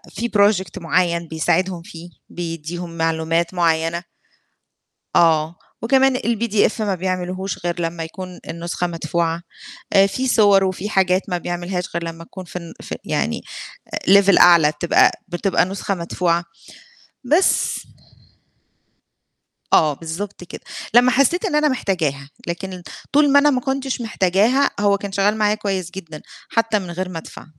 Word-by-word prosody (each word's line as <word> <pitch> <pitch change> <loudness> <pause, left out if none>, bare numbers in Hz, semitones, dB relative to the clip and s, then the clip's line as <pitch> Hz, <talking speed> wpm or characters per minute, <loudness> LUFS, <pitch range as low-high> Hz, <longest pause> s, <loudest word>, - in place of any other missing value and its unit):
في 235 +1 -2
project 195 -4 +2
معيّن 170 0 0
بيساعدهم 175 +3 0
فيه، 170 -1 -11 0.2
بيدّيهم 170 0 -6
معلومات 165 +1 0
معيّنة. 165 0 +1 1.1
آه. 165 0 +3 0.3
وكمان 265 +2 +3
الPDF 225 -2 0
ما 200 -3 0
بيعملهوش 185 +1 -3
غير 175 0 -2
لمّا 165 0 -3
يكون 180 +2 -8
النُسخة 170 +1 -3
مدفوعة. 165 0 -2 0.5
آآ 195 0 +6
في 260 +6 -2
صور 205 -4 +5
وفي 190 +2 -2
حاجات 190 -2 +2
ما 180 - -1
بيعملهاش 175 +1 -3
غير 170 0 -2
لمّا 165 0 -7
تكون 185 +2 -10
في 180 - -10
الن 170 -2 -7
في - - -6
يعني - - -1 0.7
level 200 -1 +6
أعلى 170 -4 +7
بتبقى 160 +3 +3 0.2
بتبقى 180 +2 +1
نسخة 195 +1 -3
مدفوعة 170 -1 -1 0.8
بس. 320 +9 +2 1.9
آه، 155 -2 +5
بالضبط 180 +5 -6
كده. - - -10 0.3
لمّا 245 +1 +6
حسّيت 280 - +2
إن 300 - -1
أنا 300 0 +3
محتاجاها، 160 - -1 0.2
لكن 180 +1 -5 0.3
طول 290 -1 +4
ما 285 - +7
أنا 295 +1 +4
ما 255 -3 +1
كنتش 265 -1 -2
محتاجاها، 220 +6 +2
هو 200 -1 +3
كان 200 0 -6
شغّال 200 +2 +1
معايا 210 0 +2
كويس 190 -4 -3
جدًا 165 -5 -9 0.3
حتّى 225 -2 +1
من 180 -2 -7
غير 185 +1 -4
ما 170 - -6
أدفع. - - -12
185 Hz, 140 wpm, -20 LUFS, 170-205 Hz, 1.9 s, أعلى